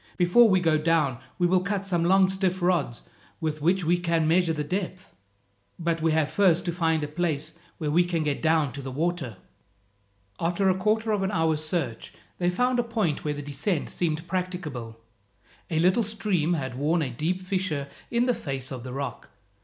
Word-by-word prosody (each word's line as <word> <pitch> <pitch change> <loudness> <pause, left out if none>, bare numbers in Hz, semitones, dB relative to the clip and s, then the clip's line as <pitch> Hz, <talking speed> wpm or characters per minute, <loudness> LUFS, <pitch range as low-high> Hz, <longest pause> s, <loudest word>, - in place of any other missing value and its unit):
Before 195 +6 +6
we 190 -2 +4
go 160 -3 +2
down, 155 -6 +1 0.2
we 175 - +2
will 180 +1 +4
cut 200 +1 -2
some 175 -3 +1
long 190 +2 +5
stiff 190 -1 0
rods 175 -10 +1 0.4
with 155 -3 -3
which 180 +3 +2
we 175 +2 +3
can 165 -2 +1
measure 170 +1 +3
the 150 -2 -2
depth. 185 +3 -4 0.6
But 165 -1 -1
we 160 0 +2
have 155 -2 +1
first 185 -5 +3
to 175 - 0
find 160 -2 +1
a - - -2
place 155 -1 -2 0.2
where 150 -3 -2
we 175 +4 +4
can 170 -2 -1
get 145 -2 -1
down 160 -3 +2
to 140 - -6
the 135 - -6
water." 145 - -2 1.0
After 175 +4 +1
a 185 - +3
quarter 215 +3 +1
of 210 -2 +1
an 190 - 0
hour's 160 -4 +1
search, 155 -8 -3 0.3
they 175 0 +2
found 250 +7 +1
a - - +3
point 220 -10 -1
where 150 -1 -1
the 145 - -6
descent 145 +4 -2
seemed 160 -1 -2
practicable. 170 -11 -4 0.7
A 160 - -1
little 185 +8 +3
stream 200 -6 0
had 130 -4 -4
worn 160 +3 +2
a 130 - -3
deep 160 +9 -1
fissure 185 -6 -2 0.2
in 235 +1 +2
the 250 - +3
face 135 - -4
of 130 -2 -5
the 125 +1 -7
rock. 140 +1 -5
170 Hz, 195 wpm, -26 LUFS, 150-185 Hz, 1.0 s, Before